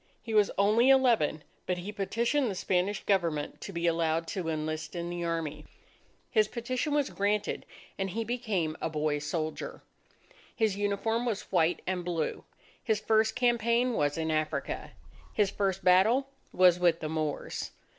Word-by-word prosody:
He 225 Hz, -, -5 dB
was 210 Hz, -2 st, +5 dB
only 215 Hz, +6 st, +4 dB
eleven; 235 Hz, -, +4 dB, 0.2 s
but 180 Hz, -, 0 dB
he 180 Hz, +4 st, -5 dB
petitioned 230 Hz, +6 st, 0 dB
the 195 Hz, -, -3 dB
Spanish 185 Hz, +3 st, 0 dB
Government 170 Hz, -7 st, 0 dB
to -, -, -6 dB
be 170 Hz, -2 st, -3 dB
allowed 165 Hz, -1 st, +1 dB
to 180 Hz, -4 st, -3 dB
enlist 155 Hz, +1 st, -3 dB
in 170 Hz, 0 st, -3 dB
the 175 Hz, 0 st, -3 dB
army. 160 Hz, -3 st, -3 dB, 0.7 s
His 215 Hz, -3 st, +4 dB
petition 255 Hz, +6 st, -2 dB
was 290 Hz, -2 st, +1 dB
granted, 205 Hz, +1 st, -1 dB, 0.3 s
and 195 Hz, 0 st, -1 dB
he 225 Hz, +5 st, -2 dB
became 220 Hz, -10 st, -1 dB
a -, -, -1 dB
boy 150 Hz, -1 st, 0 dB
soldier. 155 Hz, +1 st, -4 dB, 0.7 s
His 220 Hz, -4 st, +1 dB
uniform 205 Hz, +3 st, 0 dB
was 220 Hz, -4 st, -1 dB
white 170 Hz, -2 st, +2 dB
and 185 Hz, -1 st, -2 dB
blue. 170 Hz, -3 st, -2 dB, 0.4 s
His 220 Hz, -3 st, +1 dB
first 220 Hz, 0 st, +2 dB
campaign 240 Hz, 0 st, +2 dB
was 145 Hz, -7 st, 0 dB
in 160 Hz, 0 st, -1 dB
Africa. 155 Hz, 0 st, -2 dB, 0.4 s
His 205 Hz, -3 st, +2 dB
first 195 Hz, -2 st, -1 dB
battle 220 Hz, +10 st, +4 dB, 0.2 s
was 180 Hz, -1 st, +5 dB
with 170 Hz, -2 st, +3 dB
the 155 Hz, -, -3 dB
Moors. 155 Hz, -2 st, -3 dB
190 Hz, 155 wpm, -29 LUFS, 165-225 Hz, 0.7 s, was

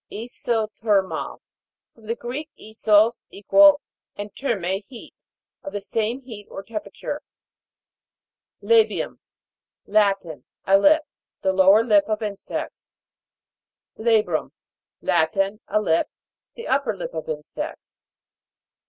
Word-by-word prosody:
ISOTHER'MAL. 220 Hz, -3 st, -1 dB, 0.5 s
From 220 Hz, -2 st, -18 dB
the 230 Hz, -, -1 dB
Greek, 260 Hz, +7 st, -6 dB
isos, 220 Hz, +1 st, +2 dB
equal, 295 Hz, +8 st, +5 dB, 0.3 s
and 205 Hz, 0 st, -7 dB
therme, 195 Hz, -7 st, -2 dB
heat. 245 Hz, -4 st, -12 dB, 0.5 s
Of 290 Hz, -, -8 dB
the 205 Hz, -, -2 dB
same 225 Hz, +5 st, -2 dB
heat 220 Hz, -6 st, -10 dB
or 195 Hz, -, -7 dB
temperature. 215 Hz, +1 st, -6 dB, 1.4 s
LA'BIUM. 455 Hz, -1 st, +2 dB, 0.7 s
Latin. 195 Hz, -9 st, +1 dB, 0.2 s
A 195 Hz, +1 st, +5 dB
lip. 310 Hz, +7 st, +5 dB, 0.4 s
The 190 Hz, -, +1 dB
lower 195 Hz, +3 st, +6 dB
lip 210 Hz, -4 st, +4 dB
of 215 Hz, +1 st, -1 dB
insects. 205 Hz, -2 st, -5 dB, 1.1 s
LA'BRUM. 215 Hz, -8 st, +1 dB, 0.5 s
Latin. 195 Hz, +5 st, +1 dB
A 215 Hz, -, +2 dB
lip. 165 Hz, -6 st, +1 dB, 0.5 s
The 465 Hz, -, -8 dB
up 275 Hz, +1 st, +1 dB
per 220 Hz, -4 st, -1 dB
lip -, -, -6 dB
of 160 Hz, -1 st, -5 dB
insects. 150 Hz, -1 st, -7 dB
215 Hz, 110 wpm, -23 LUFS, 195-235 Hz, 1.4 s, lower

